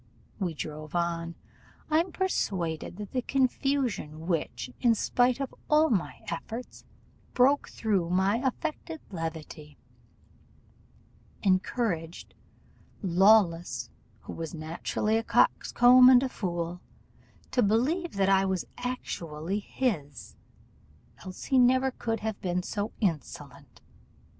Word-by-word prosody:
We 175 Hz, -5 st, -2 dB
drove 155 Hz, +1 st, -7 dB
on: 170 Hz, -1 st, -1 dB, 0.6 s
I'm 330 Hz, +4 st, +2 dB
persuaded 185 Hz, -, -2 dB
that 205 Hz, -1 st, -7 dB
the 255 Hz, -, -1 dB
confusion 255 Hz, -, -1 dB
which, 175 Hz, +8 st, -2 dB
in 235 Hz, -2 st, +4 dB
spite 245 Hz, +3 st, +2 dB
of 275 Hz, -2 st, -4 dB, 0.2 s
all 305 Hz, 0 st, +4 dB
my 195 Hz, -6 st, -1 dB
efforts, 225 Hz, +9 st, -6 dB, 0.5 s
broke 270 Hz, +3 st, +3 dB
through 195 Hz, -6 st, -1 dB
my 190 Hz, +4 st, +2 dB
affected 310 Hz, +5 st, -3 dB
levity, 160 Hz, -3 st, -6 dB, 1.7 s
encouraged 185 Hz, -3 st, -1 dB, 0.7 s
Lawless, 175 Hz, -, +3 dB, 0.3 s
who -, -, -8 dB
was 165 Hz, 0 st, -6 dB
naturally 165 Hz, +7 st, -1 dB
a -, -, -4 dB
coxcomb 245 Hz, +2 st, +5 dB
and 255 Hz, 0 st, +7 dB
a 265 Hz, -, -1 dB
fool, 175 Hz, -4 st, -4 dB, 0.7 s
to 250 Hz, -, +2 dB
believe 270 Hz, -, +1 dB
that 195 Hz, -1 st, +2 dB
I 195 Hz, 0 st, +4 dB
was 190 Hz, -2 st, -1 dB
actually 185 Hz, -8 st, -4 dB
his, 195 Hz, -, -3 dB, 0.9 s
else 185 Hz, -1 st, -8 dB
he 265 Hz, -, +2 dB
never 260 Hz, +2 st, +4 dB
could 225 Hz, -3 st, -3 dB
have 220 Hz, -1 st, -4 dB
been 180 Hz, -1 st, -1 dB
so 205 Hz, +3 st, -3 dB
insolent. 165 Hz, -, -4 dB
200 Hz, 110 wpm, -28 LUFS, 170-250 Hz, 1.7 s, and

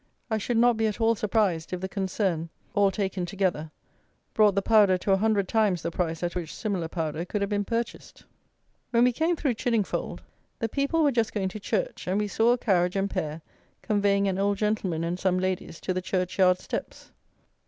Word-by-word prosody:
I 220 Hz, -, +1 dB
should 235 Hz, +3 st, -1 dB
not 240 Hz, 0 st, +4 dB
be 220 Hz, 0 st, +2 dB
at 210 Hz, -, -3 dB
all 225 Hz, 0 st, +4 dB
surprised, 200 Hz, -6 st, 0 dB
if 180 Hz, -, -2 dB
the 190 Hz, -, -3 dB
concern, 190 Hz, -4 st, -2 dB, 0.2 s
all 205 Hz, -1 st, +4 dB
taken 190 Hz, -1 st, -2 dB
together, 175 Hz, -4 st, -1 dB, 0.6 s
brought 210 Hz, -3 st, +4 dB
the 200 Hz, -, +2 dB
powder 205 Hz, -4 st, +5 dB
to 195 Hz, -, -1 dB
a 195 Hz, -, +5 dB
hundred 205 Hz, -2 st, +1 dB
times 210 Hz, -6 st, +1 dB
the 170 Hz, -, -2 dB
price 165 Hz, -1 st, -2 dB
at 175 Hz, -, -1 dB
which 170 Hz, -3 st, -4 dB
similar 195 Hz, -7 st, -2 dB
powder 160 Hz, -1 st, -3 dB
could 200 Hz, +3 st, -3 dB
have 200 Hz, +1 st, -1 dB
been 205 Hz, 0 st, +1 dB
purchased. 230 Hz, +2 st, -4 dB, 0.7 s
When 235 Hz, 0 st, +3 dB
we 250 Hz, -, +5 dB
came 325 Hz, +7 st, +1 dB
through 280 Hz, -5 st, 0 dB
Chiddingfold, 225 Hz, -3 st, -1 dB, 0.4 s
the 225 Hz, -, -2 dB
people 280 Hz, +6 st, +1 dB
were 290 Hz, -, +4 dB
just 230 Hz, -3 st, 0 dB
going 190 Hz, -2 st, 0 dB
to 215 Hz, -, -7 dB
church; -, -, -2 dB
and 185 Hz, +2 st, +1 dB
we 210 Hz, 0 st, 0 dB
saw 225 Hz, +3 st, +3 dB
a -, -, 0 dB
carriage 180 Hz, -5 st, +1 dB
and 195 Hz, 0 st, 0 dB
pair 155 Hz, -3 st, -3 dB, 0.4 s
conveying 200 Hz, -2 st, +2 dB
an 190 Hz, 0 st, -1 dB
old 200 Hz, 0 st, +1 dB
gentleman 200 Hz, -6 st, -1 dB
and 175 Hz, +2 st, -2 dB
some 185 Hz, -1 st, +1 dB
ladies 185 Hz, -3 st, -2 dB
to 185 Hz, -, -1 dB
the 185 Hz, -, -2 dB
churchyard 185 Hz, 0 st, +2 dB
steps. -, -, -6 dB
200 Hz, 205 wpm, -27 LUFS, 180-220 Hz, 0.7 s, powder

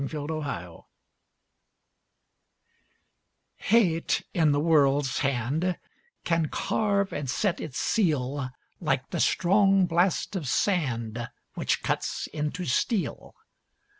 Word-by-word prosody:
A -, -, -2 dB
PROUD 150 Hz, 0 st, -5 dB
LADY 90 Hz, -, -5 dB, 2.8 s
Hate 190 Hz, -7 st, +2 dB
in 160 Hz, -3 st, +3 dB
the 145 Hz, -, +2 dB
world's 145 Hz, -5 st, +3 dB
hand 140 Hz, +8 st, 0 dB, 0.5 s
Can 165 Hz, -2 st, +1 dB
carve 200 Hz, +3 st, 0 dB
and 145 Hz, -3 st, -3 dB
set 190 Hz, -, 0 dB
its 130 Hz, -4 st, -6 dB
seal 145 Hz, -, 0 dB, 0.3 s
Like 135 Hz, -6 st, -1 dB
the -, -, -2 dB
strong 195 Hz, +1 st, +4 dB
blast 175 Hz, +4 st, +1 dB
of 165 Hz, -7 st, -3 dB
sand 120 Hz, -, 0 dB, 0.2 s
Which -, -, -1 dB
cuts -, -, -2 dB
into 150 Hz, +4 st, -3 dB
steel. 190 Hz, -, -1 dB
155 Hz, 105 wpm, -27 LUFS, 135-185 Hz, 2.8 s, strong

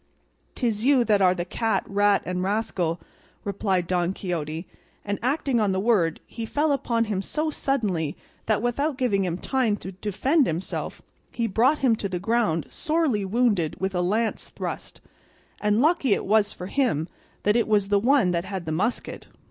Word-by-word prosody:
"'Tis 225 Hz, -4 st, -1 dB
you 265 Hz, -1 st, +5 dB
that 210 Hz, -3 st, +2 dB
are 185 Hz, -1 st, +5 dB
the 175 Hz, -1 st, -3 dB
cat, 220 Hz, -1 st, 0 dB
rat, 205 Hz, 0 st, +3 dB
and 180 Hz, 0 st, -2 dB
rascal," 185 Hz, -4 st, -1 dB, 0.4 s
replied 195 Hz, -2 st, 0 dB
Don 175 Hz, +1 st, 0 dB
Quixote, 165 Hz, -3 st, -4 dB, 0.4 s
and 205 Hz, 0 st, -2 dB
acting 260 Hz, 0 st, +1 dB
on 205 Hz, -3 st, +2 dB
the 190 Hz, -, 0 dB
word 190 Hz, -7 st, +2 dB
he 230 Hz, -, -7 dB
fell 295 Hz, +7 st, 0 dB
upon 235 Hz, -4 st, +1 dB
him 205 Hz, -3 st, -1 dB
so 310 Hz, +9 st, -2 dB
suddenly 200 Hz, -, -1 dB, 0.3 s
that 215 Hz, 0 st, +1 dB
without 275 Hz, +4 st, 0 dB
giving 220 Hz, -7 st, +1 dB
him 175 Hz, -1 st, -2 dB
time 240 Hz, -2 st, 0 dB
to 190 Hz, -, -7 dB
defend 220 Hz, -, +1 dB
himself 165 Hz, +3 st, -4 dB, 0.3 s
he 235 Hz, -, -1 dB
brought 235 Hz, +8 st, +3 dB
him 235 Hz, -3 st, +5 dB
to 200 Hz, -, -3 dB
the 180 Hz, -, -2 dB
ground 200 Hz, -4 st, +1 dB
sorely 310 Hz, -, 0 dB
wounded 200 Hz, -5 st, +1 dB
with 190 Hz, 0 st, -1 dB
a 180 Hz, -, 0 dB
lance 215 Hz, +5 st, -1 dB
thrust; -, -, -6 dB, 0.6 s
and 210 Hz, +2 st, +2 dB
lucky 300 Hz, -, +3 dB
it -, -, -4 dB
was 210 Hz, +1 st, +3 dB
for 180 Hz, -, -8 dB
him 195 Hz, -, 0 dB, 0.4 s
that 210 Hz, +1 st, +3 dB
it 235 Hz, -, +2 dB
was 205 Hz, -2 st, +2 dB
the 200 Hz, 0 st, +4 dB
one 245 Hz, -4 st, +3 dB
that 170 Hz, 0 st, -1 dB
had 190 Hz, -3 st, -5 dB
the 160 Hz, -, -3 dB
musket. 205 Hz, +10 st, -2 dB
205 Hz, 180 wpm, -25 LUFS, 185-240 Hz, 0.6 s, you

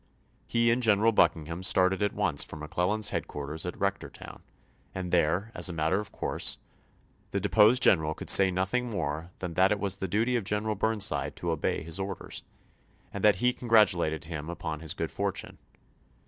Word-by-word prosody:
He 115 Hz, 0 st, +2 dB
and 120 Hz, +2 st, +1 dB
General 110 Hz, -1 st, +3 dB
Buckingham 85 Hz, -3 st, +1 dB
started 95 Hz, +1 st, +2 dB
at 105 Hz, -, 0 dB
once -, -, +2 dB
for -, -, -9 dB
McClellan's 90 Hz, +7 st, -1 dB
headquarters 75 Hz, +4 st, -4 dB
at 90 Hz, -, -6 dB
Rectortown, 100 Hz, 0 st, -5 dB, 0.5 s
and 90 Hz, -2 st, -5 dB
there, 90 Hz, +5 st, +1 dB
as -, -, +2 dB
a -, -, -5 dB
matter 80 Hz, +4 st, 0 dB
of 105 Hz, -, -7 dB
course, -, -, -2 dB, 0.7 s
the -, -, -2 dB
deposed 110 Hz, +4 st, +4 dB
general 80 Hz, -4 st, +4 dB
could -, -, -1 dB
say 95 Hz, -1 st, +8 dB
nothing 95 Hz, +7 st, -1 dB
more 80 Hz, -5 st, -4 dB
than 90 Hz, -2 st, -5 dB
that 95 Hz, +4 st, +3 dB
it 105 Hz, -, 0 dB
was 100 Hz, -1 st, -2 dB
the 95 Hz, -, -4 dB
duty 115 Hz, +7 st, 0 dB
of 120 Hz, -, 0 dB
General 105 Hz, +2 st, -2 dB
Burnside 105 Hz, 0 st, -1 dB
to 85 Hz, -, -3 dB
obey 80 Hz, -2 st, -2 dB
his 85 Hz, +4 st, -2 dB
orders, 95 Hz, 0 st, -6 dB, 0.7 s
and -, -, -6 dB
that 105 Hz, -2 st, +5 dB
he 125 Hz, +6 st, +1 dB
congratulated 105 Hz, -11 st, +2 dB
him 80 Hz, -1 st, -6 dB
upon 80 Hz, -3 st, -5 dB
his 80 Hz, -1 st, -2 dB
good -, -, -4 dB
fortune. -, -, -4 dB
95 Hz, 175 wpm, -28 LUFS, 85-105 Hz, 0.7 s, say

